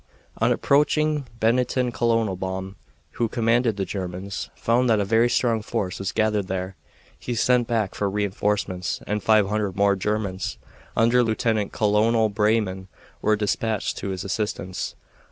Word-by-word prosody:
On - - +3
approaching 150 0 +2
Bennington 125 +2 +1
Colonel 115 -4 +1
Baum, 95 +1 -5 0.4
who 120 - -1
commanded 115 -1 +1
the 95 - -1
Germans, 95 0 -5
found 120 +2 +1
that 110 -2 +4
a 100 - +1
very 115 +4 +3
strong 115 -2 +1
force 105 -4 -3
was 95 -1 -2
gathered 105 -3 +1
there. 95 0 -3 0.4
He 120 - -4
sent 120 +1 +3
back 110 -4 0
for 100 - -1
re 105 +1 0
enforcements, 100 -2 -1
and 105 0 -2
five 110 -2 +4
hundred 105 -3 -1
more 100 0 +3
Germans, 100 -2 -2 0.4
under 120 +2 +4
Lieutenant 110 -2 0
Colonel 110 +1 +2
Breyman, 105 -3 0 0.3
were 110 - +3
dispatched 105 +1 -1
to 100 - -4
his 95 -1 -4
assistance. 95 -2 -3
105 Hz, 150 wpm, -24 LUFS, 95-115 Hz, 0.4 s, that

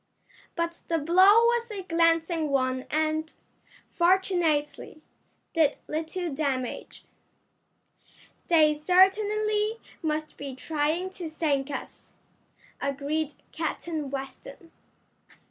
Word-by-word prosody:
But 335 0 -3
the 330 - +1
blow 345 +5 +5 0.2
was 475 0 +1
a 405 -3 -6
glancing 330 -2 +1
one 255 -1 0
and, 315 +1 0 0.6
fortunately, 345 -5 +1 0.5
did 315 -4 +3
little 320 +1 -3
damage. 270 -4 -3 1.4
"They 310 -3 +5
certainly 420 +6 +2 0.2
must 310 -1 -3
be 275 -2 -6
trying 315 +6 -1
to 355 -4 -6
sink 295 -3 -1
us," 275 - -8 0.7
agreed 285 +2 -2 0.2
Captain 320 -2 -3
Weston. 275 - -8
320 Hz, 90 wpm, -27 LUFS, 295-360 Hz, 1.4 s, blow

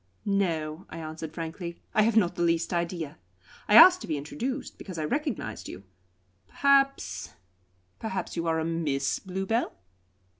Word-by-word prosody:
"No," 170 -5 -1
I - - -8
answered 160 -1 -6
frankly. 170 +2 -6
"I 215 - +4
have 225 +1 +3
not 180 -5 +4
the - - -5
least 165 0 +1
idea. 170 -3 -3 0.5
I 210 - +4
asked 365 +9 +10
to - - -7
be 155 -3 -1
introduced 250 - -5
because 185 -4 -8
I 155 - -1
recognised 240 - -3
you. 95 - -9 0.6
Perhaps 275 - +1 0.6
perhaps 205 -4 -4
you 170 -1 -2
are 160 0 +1
a 160 - -1
Miss 155 -5 -1
Bluebell?" 195 +5 -2
170 Hz, 150 wpm, -28 LUFS, 160-215 Hz, 0.6 s, asked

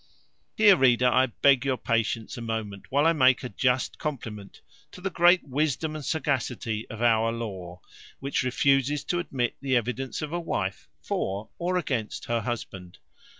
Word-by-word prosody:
Here, 210 -2 +7
reader, 125 -4 +4
I 130 +2 +4
beg 135 +2 +3
your 135 -2 0
patience 115 -1 -1
a 120 - -7
moment, 110 -4 -5
while 145 +3 +2
I 165 - +5
make 130 -4 +4
a 125 - -4
just 125 +3 0
compliment 110 -9 -6 0.3
to - - -10
the 190 +1 -3
great 175 0 +4
wisdom 150 +2 -1
and 155 - -6
sagacity 125 -7 -2
of 110 +1 -5
our 115 -1 +3
law, 95 -6 -6 0.4
which 140 +1 -1
refuses 135 +2 +1
to 175 - -1
admit 130 -8 -2
the 135 -2 0
evidence 125 +3 -2
of 155 +1 -5
a 175 - -1
wife 95 - -3
for 100 +7 -3
or 180 +1 0
against 125 -11 -3
her 120 -1 -1
husband. 95 -6 -6
125 Hz, 165 wpm, -26 LUFS, 115-145 Hz, 0.4 s, Here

